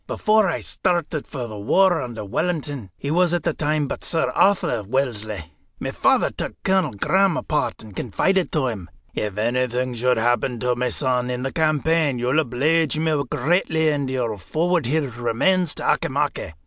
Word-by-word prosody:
Before 215 -1 +2
I - - -2
started 165 -4 -1
for 130 -5 -5
the 110 -3 -8
war 175 - +3
under 115 -4 -6
Wellington 145 - -2
he 140 - -4
was 175 +1 +3
at 175 - -2
the - - 0
time 150 -1 0
but - - -5
Sir 165 - 0
Arthur 180 - +2
Wellesley 110 -6 -2 0.3
my - - -3
father - - +2
took - - -5
Colonel 190 - +2
Graham 190 - +2
apart 150 -6 -2
and 105 -3 -13
confided 185 - 0
to 150 -4 +1
him: 105 -9 -4 0.2
'If 105 -2 -3
anything 125 +2 0
should 125 +1 +1
happen 120 +1 +1
to 125 0 +1
my 125 +1 -1
son 125 -2 0
in 125 0 -3
the 135 - -3
campaign, 155 -2 +1
you'll 125 +5 +1
obleege 155 +4 +1
me 155 -2 +1
greatly 160 +2 +1
if 145 -3 -1
you 130 -1 -1
will 110 -3 -2
forward 165 - 0
his 140 -4 -1
remains 145 +9 +1
to - - -5
Auchimachie. 80 - 0
135 Hz, 175 wpm, -22 LUFS, 120-160 Hz, 0.3 s, war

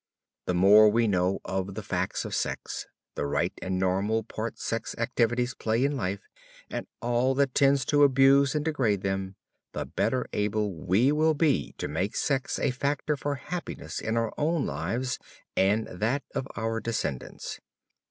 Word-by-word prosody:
The 90 - +1
more 105 +4 +7
we 115 +2 +2
know 95 -1 +1
of 95 0 -3
the 110 - -5
facts 95 -2 -2
of - - -5
sex, - - -3 0.3
the 70 - -2
right 70 - 0
and 95 0 -2
normal 100 +4 +1
part 110 +2 -5
sex 115 -1 -3
activities 120 +1 +1
play 115 +4 0
in 145 +1 0
life, 100 -5 -2 0.5
and - - -4 0.2
all 120 +2 +2
that 140 -2 +2
tends 140 -1 +4
to 145 -1 +3
abuse 135 +1 +5
and 150 0 0
degrade 120 - +1
them, 95 0 -2 0.4
the - - -3
better 130 -1 0
able 105 -1 0
we 95 - +2
will 155 +1 +3
be 150 -3 +1
to - - -3
make 90 +8 -2
sex 135 -3 0
a - - +1
factor 140 +3 -1
for 145 0 -2
happiness 175 +5 -5
in 110 +1 -1
our 115 -1 0
own 160 0 +1
lives 105 - -2 0.4
and 105 +3 +3
that 115 +10 -1
of 135 -1 -2
our 115 +2 -1
descendants. 110 - -4
115 Hz, 165 wpm, -28 LUFS, 100-135 Hz, 0.5 s, more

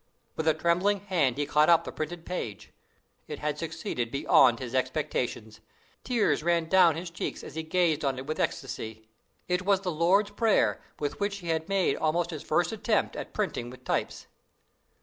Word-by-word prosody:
"With 160 - -3
a 160 - +4
trembling 180 +5 +1
hand 165 - +1
he 145 - 0
caught 150 +2 +3
up 170 -1 +6
the - - -6
printed 165 +2 -5
paper. 115 - -5 0.6
It - - -5
had - - -3
succeeded 120 -2 -3
beyond 130 -2 +4
his 120 0 -6
expectation. 130 -4 -1 0.5
Tears 240 -10 +1
ran 170 0 +1
down 170 -3 +5
his 170 +1 -6
cheeks 170 - -5
as - - -9
he 160 - -3
gazed 160 -1 +1
on 135 -2 0
it 130 - -6
with 155 +2 -4
ecstacy. 110 -4 -3 0.4
It 180 0 +1
was 195 0 +2
the 185 -2 -2
Lord's 185 +6 +2
Prayer, 220 +1 +2 0.2
with 145 0 -3
which 200 0 -1
he 175 -4 -7
had 160 +1 -1
made 195 -2 +2
almost 170 +2 0
his 155 -3 -6
first - - +1
attempt - - 0
at - - -6
printing 120 - -2
with 125 +1 -13
types. - - -2
160 Hz, 185 wpm, -28 LUFS, 140-180 Hz, 0.6 s, up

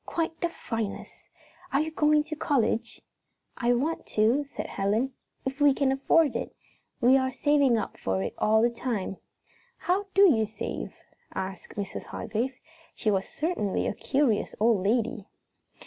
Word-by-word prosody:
"Quite 325 -1 -2
the 345 - +1
finest! 225 -10 -5 0.4
Are 275 - +3
you 315 +1 -1
going 300 -1 +3
to 310 0 -6
college?" 240 -5 0 0.5
"I 245 0 +2
want 295 +7 -1
to," 230 +7 +2
said 280 - -6
Helen, 215 +7 0 0.3
"if 270 +2 -4
we 285 -2 +6
can 275 -1 +2
afford 280 +2 +3
it. - - -4 0.4
We 260 +2 +6
are 260 0 0
saving 285 -3 +3
up - - -4
for 95 0 -1
it - - -3
all 220 +1 +4
the 240 - +3
time." 225 -6 -3 0.6
"How 390 +3 0
do 395 - +7
you 230 - +5
save?" 215 +1 -5 0.4
asked 190 -1 -5
Mrs. 200 -2 -5
Hargrave. 240 +5 -3 0.4
She 215 - 0
was 195 -1 0
certainly 300 - -1
a - - 0
curious 265 -2 0
old 220 -3 +3
lady. 225 -1 0
250 Hz, 155 wpm, -27 LUFS, 215-290 Hz, 0.6 s, do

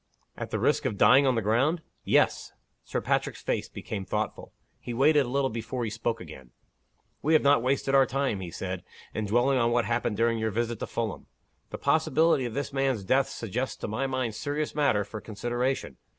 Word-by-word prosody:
"At - - -6
the - - -1
risk - - +1
of 100 - -1
dying 130 +8 +6
on 130 - +3
the 115 - 0
ground?" 140 - +2 0.2
"Yes." - - +2 0.3
Sir - - -3
Patrick's - - -1
face - - -1
became 100 -3 -5
thoughtful. - - -3 0.3
He 120 - -6
waited 145 +1 +4
a - - -5
little 135 0 +1
before 115 +2 -4
he 110 - -2
spoke 115 +1 -2
again. 70 -7 -11 0.7
"We 155 - +2
have 155 - +5
not 140 -3 +5
wasted 135 +2 0
our 135 -1 +6
time," 135 -6 -1
he 90 -2 -6
said, 95 +1 -5 0.3
"in 110 -1 -2
dwelling 125 +5 +3
on 115 -1 +3
what 120 -1 +2
happened 115 -3 -1
during 115 0 +2
your 110 0 0
visit 115 +1 -2
to - - -4
Fulham. 115 -4 -4 0.4
The - - -6
possibility 160 -3 +2
of 120 -1 -5
this 140 0 -3
man's 135 -6 0
death 130 +7 +2
suggests 120 +4 -3
to - - -5
my 125 +6 -1
mind 130 -4 -2
serious 145 +5 -3
matter 140 -9 +2
for 105 +1 -8
consideration. 120 +4 -2
120 Hz, 200 wpm, -28 LUFS, 110-135 Hz, 0.7 s, dying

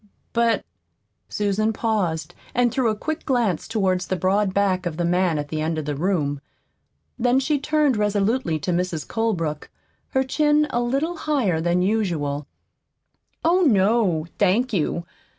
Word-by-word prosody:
"But 235 -1 +2 0.3
" - - -51
Susan 210 +2 0
paused 180 -8 -1 0.2
and 245 0 +3
threw 255 -2 +1
a 215 - 0
quick 315 +9 -4
glance 235 - 0
toward 190 -5 +1
the 185 0 -2
broad 190 +2 +1
back 185 -2 +1
of 160 -2 -5
the 175 - 0
man 175 -1 +2
at 145 -1 -4
the 155 0 -2
end 160 +1 -1
of 155 - -3
the 150 - -2
room. 145 -4 -1 0.8
Then 245 +2 +3
she 285 +2 0
turned 300 -2 +2
resolutely 210 -2 +1
to 180 - -1
Mrs. 175 -3 -2
Colebrook, 165 -10 -2 0.4
her 265 - +1
chin 295 +3 +2
a 240 - 0
little 275 +8 -1
higher 255 - 0
than 175 +2 +1
usual. 165 -9 -1 1.0
"Oh, 350 +3 +4
no, 200 - +3
thank 215 +6 +2
you. 170 -1 -1
200 Hz, 155 wpm, -23 LUFS, 170-240 Hz, 1.0 s, Oh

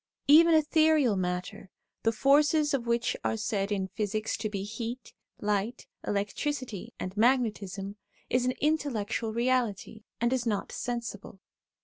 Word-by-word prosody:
Even 325 +3 +7
ethereal 310 -5 +4
matter, 180 0 -3 0.3
the 225 - +2
forces 295 +5 +3
of 245 -4 -1
which 235 0 +1
are 225 - 0
said 210 -2 -1
in 195 -2 0
physics 215 +1 -2
to 215 - -3
be 200 -2 -4
heat, 230 +4 -6 0.3
light, 210 +3 -1 0.2
electricity, 210 +2 -3
and 185 +1 -5
magnetism, 210 -4 0 0.3
is 250 0 +1
an 255 0 0
intellectual 270 -8 0
reality, 235 -3 -1 0.2
and 235 +2 +2
is 250 -2 -1
not 210 -3 -1
sensible. 235 -5 -5
230 Hz, 130 wpm, -29 LUFS, 205-260 Hz, 0.3 s, Even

